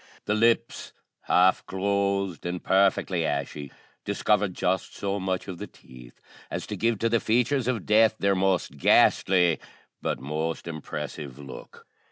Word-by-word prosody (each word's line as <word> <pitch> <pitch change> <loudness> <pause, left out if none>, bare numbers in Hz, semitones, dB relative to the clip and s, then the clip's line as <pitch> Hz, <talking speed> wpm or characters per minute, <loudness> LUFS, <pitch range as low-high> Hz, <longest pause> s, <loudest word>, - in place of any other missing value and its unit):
The 105 - 0
lips, 115 +2 +1 0.3
half 90 +1 +4
closed 100 -1 -1
and 90 0 -4
perfectly 95 -2 +2
ashy, 70 -1 -3 0.3
discovered 105 -3 0
just 95 +1 -1
so 100 0 -2
much 95 -1 -2
of 90 -3 -7
the - - -6
teeth 60 -1 -16 0.3
as - - -4
to - - -5
give 115 0 +1
to 115 - 0
the 115 0 +2
features 125 +3 +1
of 125 -4 -1
death 110 +1 +4
their 100 0 +2
most 95 -7 0
ghastly, 90 +3 +4 0.4
but - - -2
most 80 +4 -3
impressive 75 -3 -6
look. 70 -2 -11
95 Hz, 145 wpm, -26 LUFS, 80-105 Hz, 0.4 s, half